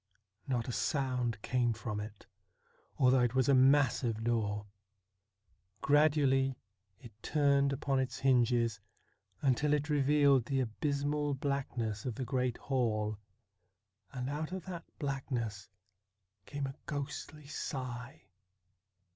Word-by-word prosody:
Not 125 -3 -1
a - - -2
sound 125 -5 -1
came 120 -2 +1
from 110 -1 -4
it, 105 0 -8 0.7
although 130 0 +5
it 120 0 +1
was 130 -1 +3
a 140 - +5
massive 130 -4 +3
door. 105 -3 0 1.2
Gradually 140 -3 +3 0.4
it 120 +1 -13
turned 140 -1 +2
upon 140 -1 0
its 130 -2 -2
hinges, 120 -4 +3 0.6
until 145 +2 +2
it 145 +1 -2
revealed 140 -3 +4
the 135 -2 0
abysmal 145 +4 -1
blackness 130 -6 -2
of 125 -4 -2
the 130 - -3
great 125 -1 -1
hall, 110 -5 -1 0.9
and 125 -1 -4
out 150 +4 -3
of 185 -1 -5
that 175 -3 -6
blackness 125 -8 -3 0.8
came 145 -1 -3
a 135 - -5
ghostly 145 +1 -5
sigh. 130 -4 -5
130 Hz, 115 wpm, -33 LUFS, 120-140 Hz, 1.2 s, although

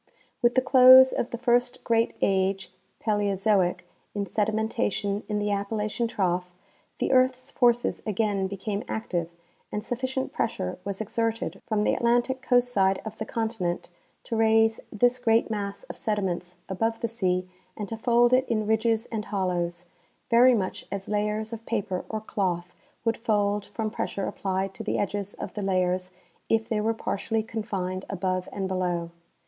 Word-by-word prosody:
^^'"ith 240 0 +4
the 255 - +4
close 260 0 +9
of 240 - -1
the 235 - -4
first 245 +1 +1
great 230 0 +1
age 190 -1 +1 0.3
(Paleozoic) 200 -4 +1 0.3
in 200 -1 -1
sedi 210 +3 0
nientation 215 -2 -1
in 210 - 0
the 205 0 0
Appalachian 210 +3 -1
trough, 180 -4 -1 0.5
the - - 0
earth's 255 +1 +2
forces 240 -2 +2
again 205 -2 0
became 200 +2 -4
active, 175 -6 -2 0.4
and 210 - -3
sufficient 260 +3 -2
pressure - - -2
was 200 +1 -4
exerted 225 +1 -2
from 215 -2 +1
the - - +2
Atlantic 245 +2 +1
coast 245 -1 +3
side 190 -2 +3
of 220 0 -7
the 220 - -4
continent 220 -7 -2 0.3
to 230 - -3
raise 225 0 +4
this 245 +4 +2
great 225 -1 +2
mass 200 -2 -3
of - - -9
sediments 185 -4 -2
above 225 +4 -1
the 230 - +1
sea 185 -5 -1 0.3
and 210 - -4
to 225 - -4
fold 240 +2 +3
it 260 +1 +3
in 215 -2 +1
ridges 220 +1 +1
and 220 -2 -3
hollows, 175 -3 -2 0.5
very 245 +2 +7
much 190 -4 -2
as 195 -1 -5
layers 210 +1 -1
of 225 0 -6
paper 200 -5 -2
or 220 -1 -3
cloth 180 -4 -2 0.3
would 230 -1 +1
fold 205 -3 0
from 220 -2 -3
pressure 200 -3 -3
applied 190 0 -2
to - - -8
the 220 - -1
edges 205 0 -2
of - - -6
the 210 - -4
layers 185 -1 0 0.4
if 225 0 +2
they 220 -3 0
were 220 +2 +2
partially 225 0 -2
confined 195 -4 -3
above 185 -1 -2
and 195 -1 -3
below. 175 -2 -1
210 Hz, 165 wpm, -26 LUFS, 190-230 Hz, 0.5 s, close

